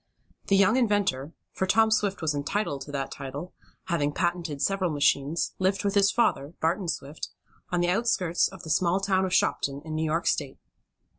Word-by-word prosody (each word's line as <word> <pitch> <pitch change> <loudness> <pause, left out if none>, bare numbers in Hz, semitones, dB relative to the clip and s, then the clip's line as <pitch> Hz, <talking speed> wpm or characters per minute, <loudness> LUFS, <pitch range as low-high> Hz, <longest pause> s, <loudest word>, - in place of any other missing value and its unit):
The 195 - +4
young 200 +5 +4
inventor, 205 - +1 0.2
for 190 - -2
Tom 220 +3 +4
Swift 200 -4 0
was 155 -1 +1
entitled 145 0 -2
to 145 - -8
that 135 -1 -3
title, 140 +5 -7 0.3
having 150 -5 -1
patented 170 -4 -1
several 195 +2 +1
machines, 145 +1 +1
lived 190 +1 +1
with 200 -1 0
his 200 -1 +4
father, 150 -9 0
Barton 170 +4 0
Swift, 150 -2 -4 0.4
on 175 -1 0
the 175 - +1
outskirts 180 -4 +1
of 190 -3 -12
the 160 - -4
small 175 +3 +2
town 190 -1 +1
of 185 - -3
Shopton, 140 0 +1
in 155 - -5
New 155 +1 -1
York 160 +2 0
State. 140 -3 -1
175 Hz, 180 wpm, -27 LUFS, 145-195 Hz, 0.4 s, The